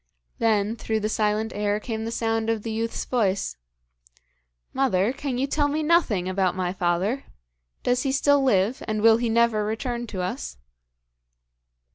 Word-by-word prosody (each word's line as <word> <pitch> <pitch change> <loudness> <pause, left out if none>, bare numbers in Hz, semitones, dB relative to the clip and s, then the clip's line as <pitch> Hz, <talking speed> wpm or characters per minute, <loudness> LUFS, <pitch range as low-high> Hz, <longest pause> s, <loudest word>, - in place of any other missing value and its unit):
Then, 215 -1 +2
through 220 -1 -2
the 215 - -1
silent 215 0 0
air 205 0 0
came 220 -1 -4
the 230 - -3
sound 225 -1 -1
of 225 -2 -1
the 225 - -4
youth's 225 +1 -2
voice: 200 - 0 1.2
'Mother, 240 -4 +2
can 275 -2 -3
you 260 - +1
tell 290 +1 +1
me 305 +2 -1
nothing 300 - +2
about 185 -1 0
my 180 -1 -1
father? 190 +7 0 0.6
Does 245 0 +2
he 270 - 0
still 285 +1 +3
live, 225 -2 +2
and 215 -1 -1
will 225 0 +7
he 235 0 -1
never 230 -2 +3
return 240 +2 -3
to 190 -4 -4
us?' 65 - -4
225 Hz, 160 wpm, -25 LUFS, 205-245 Hz, 1.2 s, will